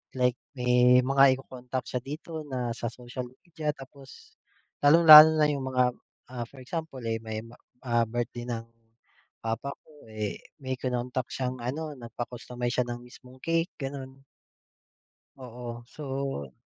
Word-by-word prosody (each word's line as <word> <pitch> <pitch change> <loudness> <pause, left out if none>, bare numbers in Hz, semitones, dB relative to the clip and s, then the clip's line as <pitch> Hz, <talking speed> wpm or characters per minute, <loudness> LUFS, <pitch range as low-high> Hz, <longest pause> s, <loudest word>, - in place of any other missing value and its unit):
like 125 -1 +2 0.2
may 125 0 +5
mga 135 0 +5
ico-contact 125 -1 -6
siya 125 - -2
dito 155 +4 -6
na 125 -3 -2
sa 120 - -4
social 125 +1 -7 0.2
media, 160 -4 -4
tapos 135 0 -14 0.4
lalong-lalo 155 +1 +10
na 155 -1 +4
yung 140 -2 -3
mga, 125 -1 +2 0.5
ah, 120 -2 -4
for 135 - -15
example 160 -2 -5
eh, 115 0 -1
may, 110 -1 -5 0.4
ah, 120 -2 +2
birthday 120 +1 -4
ng 115 -2 -3 0.8
papa 115 +5 -2
ko 150 -5 -19
eh, 105 -2 -4 0.2
may 130 0 -2
kinontak 125 0 -2
siyang 130 -1 -3
ano, 150 +6 -3
nagpa-customize 120 +1 -5
siya 125 - +2
ng 120 0 -5
mismong 125 +1 -15
cake, 165 +2 +1
gano'n. 135 -1 -7 1.1
Oo, 120 -2 -8
so 135 - -4
125 Hz, 135 wpm, -28 LUFS, 120-140 Hz, 1.1 s, lalong-lalo